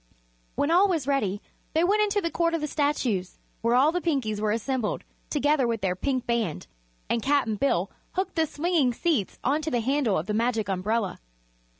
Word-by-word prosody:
When 285 - +1
all 370 +4 +6
was 330 -8 0
ready 215 -8 0 0.3
they 325 - +4
went 410 +4 +3
into 410 -1 +1
the 335 - -2
Court 335 -1 +1
of 330 - -2
the - - 0
Statues, 275 - -1 0.2
where 230 +1 +2
all 275 +5 +5
the 355 +1 -1
Pinkies 250 -11 -1
were 215 - +1
assembled 230 +1 -1 0.3
together 290 -3 +2
with 230 -2 -1
their 185 -1 0
Pink 255 +5 -1
Band 235 -9 -1 0.4
and 235 - 0
Cap'n 275 -3 +2
Bill 195 -6 0 0.2
hooked 375 0 -2
the 320 -1 +1
swinging 295 -6 +1
seats 295 - 0
onto 300 +4 +1
the 245 -5 0
handle 260 -4 +1
of 155 - -2
the 210 - -2
Magic 225 -2 0
Umbrella. 195 +2 -1
265 Hz, 190 wpm, -26 LUFS, 220-315 Hz, 0.4 s, all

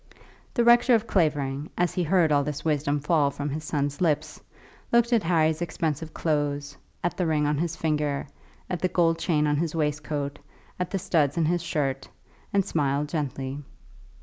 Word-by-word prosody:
The 240 - +3
rector 240 +1 +6
of 225 0 0
Clavering, 150 -7 0
as 175 0 +1
he 180 - 0
heard 170 -1 +3
all 145 -1 +4
this 145 +1 -5
wisdom 145 -2 +1
fall 150 -1 +2
from 145 +1 -4
his 155 +2 -4
son's 145 -1 -2
lips, 155 -5 0 0.5
looked 235 +1 +3
at 230 - +4
Harry's 160 -2 +2
expensive 160 -2 -2
clothes, 145 -2 -1 0.3
at 175 - 0
the 180 -3 0
ring 150 -2 +1
on 145 0 +1
his 165 0 -1
finger, 150 -3 -1 0.4
at 180 -2 -3
the 185 - +1
gold 165 -2 +2
chain 150 -4 +1
on 150 -1 +1
his 165 +1 -1
waistcoat, 150 -2 -2 0.4
at 180 - -1
the 195 - -1
studs 155 -5 +1
in 165 - +2
his 175 +2 +1
shirt, 135 -5 -2 0.4
and 200 -2 +2
smiled 145 -4 0
gently. 135 -2 -3
155 Hz, 175 wpm, -26 LUFS, 145-170 Hz, 0.5 s, rector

